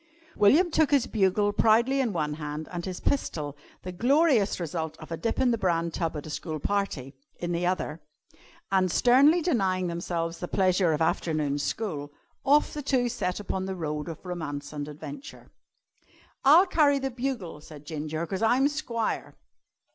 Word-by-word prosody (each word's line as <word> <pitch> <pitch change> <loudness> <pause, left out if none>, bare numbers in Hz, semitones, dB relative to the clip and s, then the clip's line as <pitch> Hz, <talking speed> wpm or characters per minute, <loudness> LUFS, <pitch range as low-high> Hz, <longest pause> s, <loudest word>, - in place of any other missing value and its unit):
William 320 - +4
took 315 -1 +3
his 280 -4 +3
bugle 205 0 +2
proudly 235 +6 +3
in 250 -5 +1
one 150 -5 -1
hand 150 +1 -5
and 175 -1 -4
his 185 -2 -5
pistol 150 - -2 0.3
(the 185 - -5
glorious 245 - +3
result 160 -1 -4
of 155 - -12
a - - -1
dip 230 +7 -2
in 255 -2 +3
the 230 - 0
bran 170 -3 0
tub 165 -2 -2
at 145 - -7
a - - -7
school 155 0 -4
party) 155 -8 -2 0.2
in 175 0 -3
the 175 +1 0
other, 170 -4 -2 0.7
and, 190 -1 +3
sternly 280 - +5
denying 190 - +1
themselves 170 -1 -3
the 175 - -4
pleasures 185 -4 +2
of 155 - 0
afternoon 155 -3 0
school, 150 -4 -3 0.3
off 290 +2 +3
the 300 - -4
two 260 -3 +1
set 180 -6 -2
upon 190 -2 -3
the 190 - -3
road 150 -2 -4
of 165 +2 -9
romance 150 -5 -5
and 145 -1 -4
adventure. 270 - -10 0.9
"I'll 310 +7 +7
carry 295 -6 +3
the 270 -1 -2
bugle," 240 - -4
said 150 -2 -12
Ginger, 155 +1 -4
"'cause 190 +4 -4
I'm 250 +5 +3
squire." 240 -7 -3
185 Hz, 170 wpm, -27 LUFS, 160-245 Hz, 0.9 s, I'll